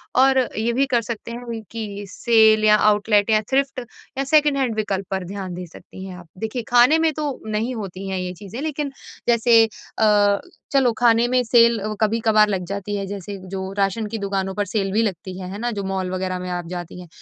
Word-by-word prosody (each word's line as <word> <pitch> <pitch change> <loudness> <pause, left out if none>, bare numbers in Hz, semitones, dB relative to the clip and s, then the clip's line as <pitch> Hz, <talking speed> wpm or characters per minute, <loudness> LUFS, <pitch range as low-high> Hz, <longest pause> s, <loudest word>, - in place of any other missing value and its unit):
और 265 +1 +5 0.2
ये 230 +2 0
भी 270 +3 +2
कर 240 - +4
सकते 230 0 -6
हैं 235 -1 -6
कि 205 -3 -6
सेल 220 0 +4
या 210 0 +7
आउटलेट 210 0 +3
या 215 -1 +4
थ्रिफ्ट 270 0 +1 0.4
या 275 - 0
सेकंड 295 0 +3
हैंड 255 -5 0
विकल्प 200 -3 -2
पर 190 -1 -1
ध्यान 190 0 -6
दे 180 0 -6
सकती 185 +3 -12
हैं 185 -1 -8
आप। 175 -1 -13
देखिए 220 +5 -3
खाने 245 +6 +6
में 325 0 +3
तो 295 -2 -4
नहीं 220 +4 -1
होती 195 -3 -6
हैं 190 -1 -2
ये 180 0 -4
चीज़ें, 200 +7 -8
लेकिन 295 -2 -3 0.4
जैसे 235 -1 +5 0.4
अ, 205 -2 +4 0.3
चलो 270 -3 +3
खाने 235 -1 +4
में 250 0 +2
सेल 235 -1 +4
अ, 215 +1 -3
कभी-कभार 215 -1 +3
लग 190 -3 -2
जाती 200 +2 -4
है। 200 -1 -3
जैसे 200 0 -6
जो 190 0 -4
राशन 200 +3 0
की 225 +2 -4
दुकानों 195 -1 -2
पर 205 - -1
सेल 195 0 -2
भी 220 +3 +2
लगती 185 -2 -4
है, 185 -1 -6
है 200 - -6
ना? 240 +1 -1
जो 205 -3 -4
मॉल 190 -1 -3
वगैरह 185 0 -2
में 180 0 -5
आप 175 -1 -4
जाती 175 0 -7
हैं, 180 - -12
215 Hz, 215 wpm, -22 LUFS, 195-235 Hz, 0.4 s, या